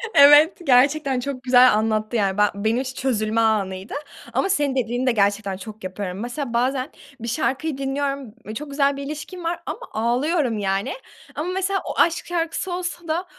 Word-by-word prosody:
Evet, 290 Hz, +4 st, +8 dB
gerçekten 275 Hz, +1 st, +3 dB
çok 260 Hz, 0 st, -5 dB
güzel 250 Hz, -2 st, +6 dB
anlattı, 215 Hz, +1 st, 0 dB
yani, 200 Hz, -3 st, +1 dB
be -, -, +3 dB
benim 220 Hz, +5 st, 0 dB
için 260 Hz, -1 st, -6 dB
çözülme 225 Hz, -3 st, +1 dB
anıydı 195 Hz, -3 st, 0 dB, 0.4 s
ama 390 Hz, -, +1 dB
senin 290 Hz, -7 st, +1 dB
dediğini 245 Hz, +1 st, -1 dB
de 255 Hz, -, +5 dB
gerçekten 200 Hz, -2 st, 0 dB
çok 215 Hz, +2 st, -10 dB
yapıyorum. 185 Hz, 0 st, -5 dB
Mesela 240 Hz, +2 st, -4 dB
bazen 255 Hz, +3 st, 0 dB, 0.3 s
bir 230 Hz, -, -6 dB
şarkıyı 275 Hz, +3 st, -1 dB
dinliyorum, 275 Hz, -3 st, -3 dB, 0.2 s
çok 300 Hz, +3 st, -6 dB
güzel 280 Hz, 0 st, +1 dB
bir 280 Hz, -, -5 dB
ilişkim 305 Hz, +5 st, -7 dB
var 335 Hz, +1 st, -2 dB
ama -, -, -5 dB
ağlıyorum 245 Hz, +3 st, +1 dB
yani. 195 Hz, -1 st, -1 dB, 0.4 s
Ama 320 Hz, +4 st, -3 dB
mesela 385 Hz, +1 st, 0 dB
o -, -, -4 dB
aşk 335 Hz, 0 st, +3 dB
şarkısı 345 Hz, +1 st, -2 dB
olsa 350 Hz, -1 st, -4 dB
da 330 Hz, +4 st, -1 dB
260 Hz, 170 wpm, -22 LUFS, 220-295 Hz, 0.4 s, Evet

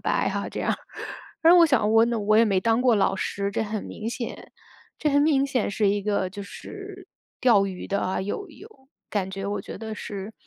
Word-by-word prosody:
白 -, -, +1 dB
哈 -, -, -3 dB
这 -, -, -5 dB
样 -, -, 0 dB
儿。 -, -, -2 dB, 0.6 s
然 330 Hz, +1 st, +7 dB
后 355 Hz, -, +8 dB
我 335 Hz, -, +8 dB
想 245 Hz, -8 st, +2 dB
我 225 Hz, +1 st, +6 dB
那 235 Hz, -1 st, -1 dB
我 215 Hz, +1 st, +3 dB
也 225 Hz, -, +6 dB
没 195 Hz, -4 st, +2 dB
当 225 Hz, +3 st, +2 dB
过 250 Hz, -2 st, +5 dB
老 195 Hz, -2 st, +2 dB
师， 200 Hz, +1 st, -2 dB
这 200 Hz, -, -1 dB
很 215 Hz, -1 st, -4 dB
明 220 Hz, -, -6 dB
显 235 Hz, 0 st, -6 dB, 0.5 s
这 300 Hz, -, +1 dB
很 285 Hz, 0 st, +4 dB
明 290 Hz, -3 st, +3 dB
显 260 Hz, -5 st, 0 dB
是 205 Hz, +1 st, +1 dB
一 205 Hz, +1 st, +1 dB
个 200 Hz, -2 st, -1 dB
就 200 Hz, +1 st, -7 dB
是 390 Hz, -, -10 dB, 0.3 s
钓 220 Hz, -6 st, +5 dB
鱼 185 Hz, -2 st, -6 dB
的 200 Hz, -, 0 dB
啊， 185 Hz, -, -1 dB
有 205 Hz, -, -4 dB
有 395 Hz, +8 st, -13 dB, 0.4 s
感 195 Hz, -3 st, -1 dB
觉 195 Hz, 0 st, -5 dB
我 205 Hz, 0 st, -2 dB
觉 -, -, -8 dB
得 220 Hz, 0 st, -6 dB
是， 200 Hz, +1 st, -6 dB
215 Hz, 245 characters per minute, -25 LUFS, 200-260 Hz, 0.6 s, 后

